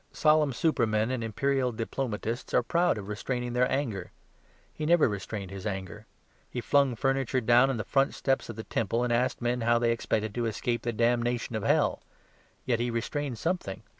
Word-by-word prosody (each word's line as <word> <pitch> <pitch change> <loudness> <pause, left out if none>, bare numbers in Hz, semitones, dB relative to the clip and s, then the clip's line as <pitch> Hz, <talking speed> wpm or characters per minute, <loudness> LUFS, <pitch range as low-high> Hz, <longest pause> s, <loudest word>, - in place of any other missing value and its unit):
Solemn 155 -2 +3
supermen 115 -6 +1
and 125 -3 -2
imperial 130 +3 0
diplomatists 115 0 -3
are - - +4
proud 175 -5 +2
of 100 -2 -7
restraining 120 +3 -3
their 125 +1 +2
anger. 115 -10 -2 0.6
He - - -6
never 170 -1 +5
restrained 100 -2 -5
His 95 +1 -5
anger. 95 +2 -6 0.4
He 125 - -4
flung 140 +1 +2
furniture 135 +1 0
down 125 +2 +4
the 105 - -2
front 135 +3 +1
steps 135 -3 0
of 115 - -5
the 110 - -6
Temple, 115 +2 -1
and 120 -1 +1
asked 125 +1 0
men 120 +1 0
how 120 +1 +3
they 120 0 +2
expected 110 -2 -1
to 120 0 -1
escape 120 +2 -2
the 120 - -2
damnation 120 +1 0
of 110 - -1
Hell. - - +2 0.6
Yet 120 -3 +1
He 120 +1 0
restrained 125 +3 -3
something. 115 - -3
120 Hz, 180 wpm, -28 LUFS, 110-135 Hz, 0.6 s, never